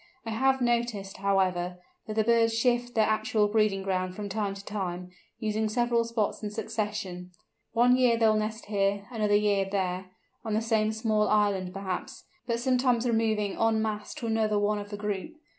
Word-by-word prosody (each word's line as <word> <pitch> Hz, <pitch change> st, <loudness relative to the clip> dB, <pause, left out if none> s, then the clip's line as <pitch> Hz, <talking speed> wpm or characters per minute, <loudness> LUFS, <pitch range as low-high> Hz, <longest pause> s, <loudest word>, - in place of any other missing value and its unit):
I 225 Hz, -, -3 dB
have 265 Hz, +4 st, +2 dB
noticed, 235 Hz, -5 st, -1 dB
however, 185 Hz, -2 st, 0 dB, 0.3 s
that 215 Hz, -, -4 dB
the 220 Hz, -, +3 dB
birds 230 Hz, 0 st, +3 dB
shift 245 Hz, 0 st, +1 dB
their 220 Hz, -1 st, +4 dB
actual 215 Hz, -1 st, +1 dB
breeding 210 Hz, -2 st, +1 dB
ground 185 Hz, -1 st, -1 dB
from 205 Hz, 0 st, -5 dB
time 200 Hz, -1 st, -2 dB
to 200 Hz, 0 st, -10 dB
time, 180 Hz, -3 st, -4 dB, 0.3 s
using 215 Hz, 0 st, -1 dB
several 235 Hz, +1 st, +1 dB
spots 230 Hz, -3 st, -1 dB
in 210 Hz, -, -3 dB
succession. 210 Hz, -4 st, -4 dB, 0.4 s
One 245 Hz, +1 st, +5 dB
year 250 Hz, -2 st, +4 dB
they 225 Hz, -, +3 dB
will 215 Hz, -, +5 dB
nest 215 Hz, +1 st, -2 dB
here, 200 Hz, -1 st, 0 dB
another 210 Hz, -3 st, +1 dB
year 205 Hz, -1 st, +3 dB
there, 185 Hz, -1 st, -1 dB, 0.4 s
on 220 Hz, -2 st, -2 dB
the 220 Hz, -, +1 dB
same 220 Hz, -1 st, +1 dB
small 215 Hz, -1 st, +1 dB
island 200 Hz, -3 st, +1 dB
perhaps, 190 Hz, -1 st, -5 dB, 0.2 s
but 235 Hz, -1 st, 0 dB
sometimes 250 Hz, -1 st, +2 dB
removing 220 Hz, -3 st, 0 dB
en 225 Hz, -1 st, +3 dB
masse 210 Hz, -1 st, -4 dB
to -, -, -6 dB
another 220 Hz, -2 st, +1 dB
one 205 Hz, +1 st, +1 dB
of 205 Hz, 0 st, -7 dB
the 205 Hz, -, -5 dB
group. 205 Hz, +1 st, -3 dB
215 Hz, 180 wpm, -28 LUFS, 200-225 Hz, 0.4 s, One